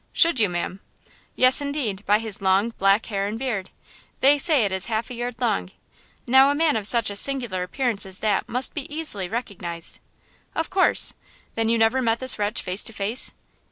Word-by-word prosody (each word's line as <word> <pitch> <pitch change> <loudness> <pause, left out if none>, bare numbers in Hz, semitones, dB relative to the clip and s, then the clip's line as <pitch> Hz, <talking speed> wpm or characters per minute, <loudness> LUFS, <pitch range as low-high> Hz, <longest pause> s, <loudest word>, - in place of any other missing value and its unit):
"Should 335 -6 +3
you, 210 -3 +3
ma'am?" 175 +2 -4 0.6
"Yes, 255 +2 +6
indeed, 275 -9 -3
by 210 - +4
his 220 -3 -4
long, 195 +3 +2
black 195 +2 +3
hair 200 -2 -3
and 215 +2 -5
beard! 225 -7 -4 0.5
They 285 +2 +4
say 280 -6 +3
it 200 - -2
is 190 0 0
half 225 +1 -3
a - - -5
yard 240 0 -5
long–now 245 - 0
a 285 - 0
man 315 0 +2
of 210 -2 -1
such 230 -3 +1
a - - -6
singular 240 -6 0
appearance 225 +3 -1
as 190 -1 -1
that 210 -3 -1
must 250 +2 -1
be 295 -1 -6
easily 295 - -2
recognized!" 180 -6 -4 0.6
"Of 325 - -3
course! 375 -1 +3 0.4
Then 225 0 -1
you 230 - +2
never 225 +4 +2
met 230 -2 +1
this 260 -2 +1
wretch 205 +2 -1
face 185 +3 +1
to 225 - -1
face?" 210 +5 +2
225 Hz, 190 wpm, -23 LUFS, 195-260 Hz, 0.6 s, Yes